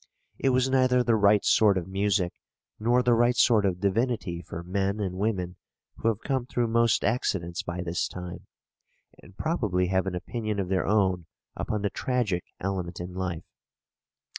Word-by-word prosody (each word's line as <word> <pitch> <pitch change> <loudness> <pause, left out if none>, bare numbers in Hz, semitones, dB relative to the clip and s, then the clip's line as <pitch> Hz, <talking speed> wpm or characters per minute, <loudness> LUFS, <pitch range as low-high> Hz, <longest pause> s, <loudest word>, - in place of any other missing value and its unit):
It 135 - +2
was 130 0 +3
neither 130 -1 +3
the 120 -2 +3
right 105 -1 +4
sort 105 -3 +5
of 90 - -3
music 95 -2 0 0.5
nor 120 +3 +3
the 125 -1 +4
right 120 +1 +3
sort 110 -5 +4
of 90 -2 -2
divinity 100 -3 0
for 85 0 -7
men 100 +3 -1
and 95 -3 -2
women 95 -4 -1 0.4
who - - -2
have 115 -2 +1
come 130 -3 -1
through 120 -2 0
most 115 -1 +3
accidents 85 -7 -1
by 85 +1 -4
this 85 0 -1
time, 90 -1 -8 0.7
and 95 +2 -17
probably 105 - 0
have 95 0 +1
an 90 - -2
opinion 110 +2 -3
of 95 -2 -2
their 95 -1 0
own 95 -4 +2 0.3
upon 105 -1 -2
the 100 - 0
tragic 115 -9 -1
element 90 -3 -3
in 90 +1 -6
life. 90 -3 -4
100 Hz, 170 wpm, -27 LUFS, 90-115 Hz, 0.7 s, sort